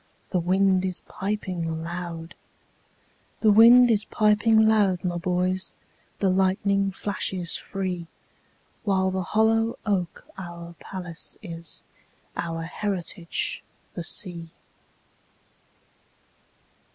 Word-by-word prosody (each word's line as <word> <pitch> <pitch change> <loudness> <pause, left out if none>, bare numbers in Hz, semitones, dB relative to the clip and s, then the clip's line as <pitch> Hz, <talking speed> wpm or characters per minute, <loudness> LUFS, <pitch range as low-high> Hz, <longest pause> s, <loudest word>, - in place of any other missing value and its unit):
The 185 - +2
wind 185 +2 +3
is 185 -1 -2
piping 180 -5 -3
loud; 170 -1 -6 1.1
The 215 - +6
wind 235 +3 +8
is 210 -2 +3
piping 220 +1 +4
loud, 205 -5 +3
my 175 -1 -1
boys, 185 +1 0 0.4
The 195 - +2
lightning 195 +1 +2
flashes 185 -2 -2
free—While 190 +1 -4
the 190 0 -1
hollow 225 +4 +2
oak 185 -5 -1
our 170 -1 -8
palace 180 -3 -4
is, 165 -3 -6 0.5
Our 165 -1 -3
heritage 175 -1 -2 0.3
the 175 - -5
sea. 170 -3 -2
185 Hz, 90 wpm, -25 LUFS, 175-205 Hz, 1.1 s, wind